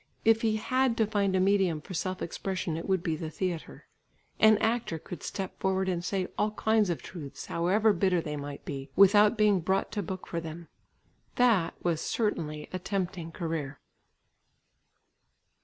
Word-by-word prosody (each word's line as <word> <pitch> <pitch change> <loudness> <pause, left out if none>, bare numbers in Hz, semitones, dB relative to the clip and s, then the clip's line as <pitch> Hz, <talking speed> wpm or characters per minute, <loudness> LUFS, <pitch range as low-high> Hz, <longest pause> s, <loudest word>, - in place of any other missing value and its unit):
If 225 0 +5
he 220 -1 +2
had 255 +2 +1
to 220 - +3
find 200 -3 0
a - - +3
medium 190 -4 +2
for 170 - -10
self 185 +2 -2
expression 185 -1 -3
it 165 +4 -5
would 190 -2 +1
be 165 -4 0
the 155 0 -5
theatre. 175 0 -4 0.5
An 220 -1 +7
actor 225 -6 0
could 165 0 -9
step 190 -2 -5
forward, 190 0 0
and 175 -2 -1
say 185 0 -1
all 210 0 +1
kinds 220 -2 +2
of 170 - -2
truths, 150 -7 -8
however 205 +6 +2
bitter 185 -1 +2
they 150 -2 -4
might 145 -1 -7
be, 135 -2 -6
without 205 +3 +6
being 210 -3 +4
brought 190 +3 0
to 210 - -2
book 185 0 -6
for 170 - -4
them. 165 +1 -8 0.7
That 225 -9 +3
was 170 -3 0
certainly 155 -9 -2
a 185 - -2
tempting 180 -3 -3
career. 160 -5 -4
185 Hz, 170 wpm, -29 LUFS, 165-210 Hz, 0.7 s, An